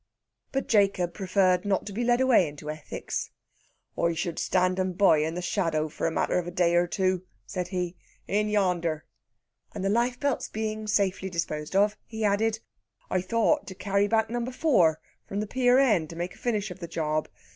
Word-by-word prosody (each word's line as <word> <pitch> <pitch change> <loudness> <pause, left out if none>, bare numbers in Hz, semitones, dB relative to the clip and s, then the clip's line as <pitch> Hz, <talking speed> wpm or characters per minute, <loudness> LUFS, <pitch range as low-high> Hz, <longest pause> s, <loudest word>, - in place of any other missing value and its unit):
But 270 - -2
Jacob 195 -5 +2
preferred 185 -2 +2
not 200 -2 0
to 205 - -6
be 235 +5 -2
led 240 +1 +3
away 245 -9 +5
into 150 +1 -6
ethics. 155 -1 -5 0.7
"I 170 0 +1
should 170 0 -3
stand 185 0 +1
'em 185 -1 0
by, 180 -4 +5
in 160 +2 -1
the 180 - -4
shadow, 165 -5 0
for 160 - -2
the - - -6
matter 170 - +1
of 175 - -5
a - - -4
day 175 -1 +2
or 175 0 +3
two," 185 -1 0 0.2
said 180 -3 -4
he. 180 -1 -3 0.3
"In 210 +1 +1
yander." 175 -6 0 0.7
And - - -4
the - - +2
life 240 +4 +1
belts 285 -2 -1
being 215 0 -3
safely 190 -2 +1
disposed 155 -2 -3
of, 205 +2 +3
he 220 -1 -3
added: 220 +2 +1 0.5
"I 185 - +2
thought 230 +10 +1
to 190 - -7
carry 200 +1 +1
back 220 +1 +1
number 240 +1 -2
fower 185 - +3 0.3
from 200 - -3
the 210 - -1
pier 250 +3 +3
end, 210 - +3
and 165 - -9
make 175 +1 -3
a - - -17
finish 215 -5 -1
of 180 - -9
the 170 - -6
job. 155 -2 -1
190 Hz, 200 wpm, -27 LUFS, 175-215 Hz, 0.7 s, away